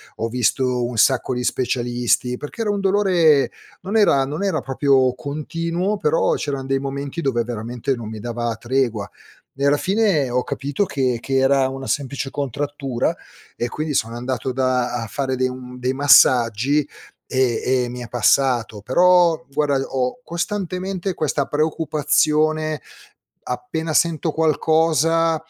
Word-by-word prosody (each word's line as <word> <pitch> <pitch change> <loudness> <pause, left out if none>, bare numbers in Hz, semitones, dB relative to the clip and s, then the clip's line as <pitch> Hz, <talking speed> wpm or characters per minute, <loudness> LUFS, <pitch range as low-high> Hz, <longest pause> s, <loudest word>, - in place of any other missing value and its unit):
ho 115 - -2
visto 125 +1 0
un 120 -2 -5
sacco 130 +2 +3
di 125 - -2
specialisti, 125 0 0
perché 150 +10 -7
era 210 -2 0
un 200 - -1
dolore 180 -9 +3 0.3
non 195 +5 -4
era 140 -10 +4
non 150 +8 -4
era 190 -5 0
proprio 135 -1 +2
continuo, 165 +8 -3
però 160 -2 +1
c'erano 140 -2 -3
dei 135 0 0
momenti 140 +3 -4
dove 120 -5 0
veramente 120 +3 -3
non 115 -2 -7
mi 110 -1 -7
dava 120 0 -3
tregua. 120 -4 -1 0.5
E 140 +1 0
alla 145 - +4
fine 190 - +1
ho 125 0 +1
capito 145 +7 -2
che 130 -6 -1
che 135 -1 -1
era 135 0 +3
una 135 0 -7
semplice 140 -1 -2
contrattura, 140 -2 -2 0.4
e 120 - -2
quindi 155 +2 -3
sono 115 -2 -1
andato 125 +1 -3
da 130 -1 0
a - - -5
fare 130 +3 -2
dei 130 0 +1
um 125 0 -8
dei 130 +1 -1
massaggi, 135 0 +4 0.4
e 130 -3 +1 0.2
e - - -3
mi 125 +1 -7
è 120 - -7
passato. 120 -2 +1
Però 170 - +3
guarda, 145 0 +1
ho 130 - -2
costantemente 185 +1 -3
questa 145 -4 -1
preoccupazione, 155 0 +1 0.6
appena 160 +5 -4
sento 165 -1 +1
qualcosa, 160 +1 +2
135 Hz, 145 wpm, -21 LUFS, 125-155 Hz, 0.6 s, era